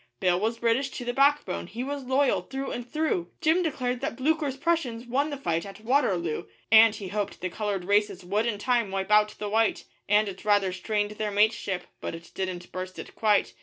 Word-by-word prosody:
Bill 180 -1 +2
was 225 +3 -1
British 235 +4 +1
to 245 - -5
the 245 - -1
backbone, 275 - +2
he 235 +3 -5
was 280 0 -4
loyal 265 +2 +2
through 270 0 -5
and 245 0 -6
through; 305 - 0
Jim 330 +2 +3
declared 255 -7 -2
that 280 +3 -2
Blucher's 290 0 0
Prussians 275 -8 -1
won 275 +5 0
the 285 - -4
fight 170 -10 -1
at 200 +1 -10
Waterloo, 195 - +1 0.3
And 225 -1 +8
he 200 -3 -6
hoped 205 +1 -3
the 185 0 -3
coloured 200 -2 -2
races 205 -2 +1
would 210 +5 0
in 220 -3 -1
time 235 0 +1
wipe 195 +1 -3
out 210 0 +4
the 210 - -4
white 220 +1 +1 0.3
And 210 +1 +4
it 195 -1 -7
rather 205 -3 +3
strained 205 +2 -1
their 210 0 -3
mateship, 205 -3 +1 0.2
but - - -4
it 165 0 -12
didn't 185 -2 -4
burst 185 0 -6
it - - -8
quite. 210 -2 +2
215 Hz, 205 wpm, -27 LUFS, 195-260 Hz, 0.3 s, And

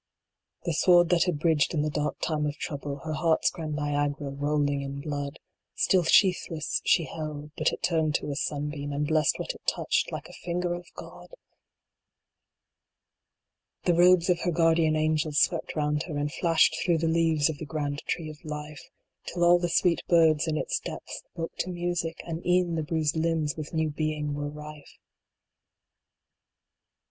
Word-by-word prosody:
The 170 - -1
sword 175 +1 +5
that 175 -2 +3
had 180 -5 0
bridged 160 0 +2
in 150 - +1
the 155 - -1
dark 150 0 -2
time 150 -2 0
of 145 - -3
trouble, 140 -1 -5
Her 155 - -2
heart 160 +1 +2
s - - +4
grand 155 -2 -5
Niagara 145 -1 -1
rolling 145 0 0
in 140 0 -5
blood; 145 0 -4 0.4
Still 185 - +3
sheathless 170 -2 +2
she 165 - +3
held; 150 -2 -6
but 155 - +1
it - - -7
turned 160 -3 +1
to - - -1
a - - -3
sunbeam, 145 0 -3
And 145 +1 -1
blessed 155 0 +2
what - - -3
it - - -15
touched, - - 0
like - - -6
a - - -14
finger 175 0 -2
of 175 0 -7
God! - - -11 2.6
Tne 175 - +3
robes 180 0 +5
of 180 -2 +2
her 175 - -1
guardian 165 -1 +3
Angels 155 -1 +1
swept - - +1
round 150 -1 0
her, 155 -4 -4
And 145 0 -2
flashed 165 -2 +3
through 170 -2 +2
the 165 +1 0
leaves 160 -2 +2
of 155 -3 -4
the - - -5
grand 145 -1 -3
Tree 160 -3 -2
of 150 - -15
Life, 150 -1 -6 0.5
Till 175 0 -1
all 175 0 +6
the 175 0 -1
sweet 170 0 +2
birds 160 -2 +4
in 155 -1 0
its - - -1
depths - - -7
woke 165 -1 -5
to - - -1
music, 175 -2 -2
And 165 0 -5
e 180 +1 +4
en 175 -2 -3
the 165 - 0
bruised 155 -1 -1
limbs 160 -2 0
with 155 -1 -6
new 160 -2 0
being 150 -1 -2
were 145 0 -3
rife. 150 0 -11
155 Hz, 180 wpm, -27 LUFS, 150-170 Hz, 2.6 s, all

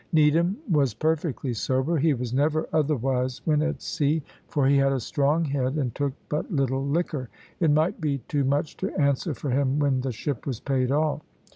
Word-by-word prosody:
Needham 165 +4 +3
was 140 - +2
perfectly 155 -2 -1
sober; 130 +8 0
he 155 0 +3
was 125 -1 -4
never 150 +4 +1
otherwise 135 -4 0
when 150 -2 +3
at 160 +1 -2
sea, 150 +1 0 0.2
for 145 -2 +1
he 140 +1 +4
had 135 0 +3
a 135 - 0
strong 145 +7 +1
head, 135 -1 -1
and 130 -6 -1
took 140 -2 -1
but 150 +5 -3
little 135 -3 0
liquor. 140 -3 -1 0.3
It 165 -4 +3
might 155 +4 +2
be 145 -3 0
too 145 -2 0
much 140 +3 0
to 190 - -2
answer 140 +2 +1
for 140 - -4
him 135 +1 +1
when 140 -3 +2
the 130 0 -2
ship 120 +3 -4
was 125 -5 -2
paid 130 -3 0
off. 150 +1 +1
140 Hz, 190 wpm, -26 LUFS, 130-155 Hz, 0.3 s, he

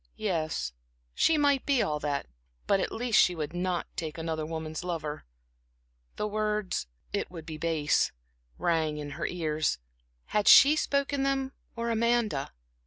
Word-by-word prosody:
Yes, 155 - -1 0.4
she 325 - +3
might 285 -2 +3
be 275 -4 +2
all 150 -1 -1
that; 145 -1 -2 0.4
but 195 - +3
at - - -1
least 240 -1 +3
she 180 - +3
would 155 -1 -4
not 180 0 -1
take 160 -1 -4
another 160 -1 -3
woman's 160 0 -5
lover. 155 -4 -4 0.9
The - - -2
words 210 - -1 0.3
"it 205 - -1
would 165 -3 -9
be 155 -2 -7
base," 155 -2 +1 0.5
rang 160 -3 +1
in 145 -1 -5
her - - -3
ears. 155 -3 -1 0.6
Had 210 -1 +2
she 290 +3 +9
spoken 280 -2 0
them, 270 -1 0 0.2
or 235 0 -2
Amanda? 230 -9 +1
175 Hz, 150 wpm, -29 LUFS, 155-230 Hz, 0.9 s, she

